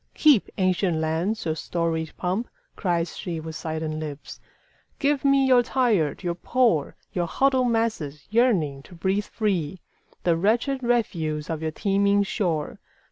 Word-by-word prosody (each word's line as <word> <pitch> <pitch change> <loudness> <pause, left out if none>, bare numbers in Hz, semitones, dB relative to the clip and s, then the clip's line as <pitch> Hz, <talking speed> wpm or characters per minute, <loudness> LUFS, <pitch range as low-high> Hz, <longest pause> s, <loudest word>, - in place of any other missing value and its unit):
"Keep, 290 -9 +5
ancient 185 -2 +1
lands, 165 +7 -1
your 160 - +1
storied 160 -1 -2
pomp!" 190 +6 -1 0.3
cries 170 -3 0
sheWith 160 -2 -5
silent 155 0 -3
lips. 150 -2 -7 0.6
"Give 285 -1 +1
me 275 -1 +4
your 255 -2 +6
tired, 230 - +1
your 175 -1 0
poor, 205 - +1 0.2
Your 175 -2 0
huddled 260 +4 +2
masses 215 -11 -1
yearning 190 - +2
to 175 - -15
breathe 190 +4 0
free, 185 -6 -1 0.4
The 170 -2 +3
wretched 235 - +1
refuse 170 -11 -1
of 160 -1 -3
your 160 - -1
teeming 200 +4 +2
shore. 175 -7 -2
180 Hz, 135 wpm, -25 LUFS, 160-230 Hz, 0.6 s, your